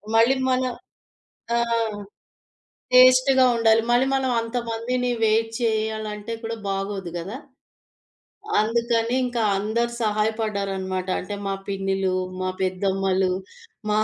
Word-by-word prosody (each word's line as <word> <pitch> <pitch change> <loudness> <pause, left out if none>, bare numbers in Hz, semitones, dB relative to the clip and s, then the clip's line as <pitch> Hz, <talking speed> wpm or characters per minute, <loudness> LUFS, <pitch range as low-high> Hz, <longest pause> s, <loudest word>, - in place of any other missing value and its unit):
మళ్ళీ 230 +4 +5
మన 255 0 +2 1.0
ఆహ్, 230 -3 0 0.9
టేస్టు‌గా 255 +1 +6
ఉండాలి. 225 -1 +4
మళ్ళీ 245 +2 +4
మనం 265 -1 +1
అంతమందిని 235 +1 -2
వెయిట్ 225 +1 +2
చేయాలంటే, 220 -1 -2
కూడా 225 0 -4
బాగోదు 195 -2 -3
గదా! 190 +8 -6 1.2
అందుకని 230 +1 +1
ఇంకా 245 -2 -1
అందరు 225 +4 -1
సహాయపడ్డారనమాట. 200 -4 -1
అంటే 205 +3 -6
మా 195 - -1
పిన్నిలు, 195 -1 -1 0.3
మా 185 0 -1
పెద్దమ్మలు, 190 0 0 0.6
మా 210 - +2
220 Hz, 100 wpm, -23 LUFS, 195-235 Hz, 1.2 s, టేస్టు‌గా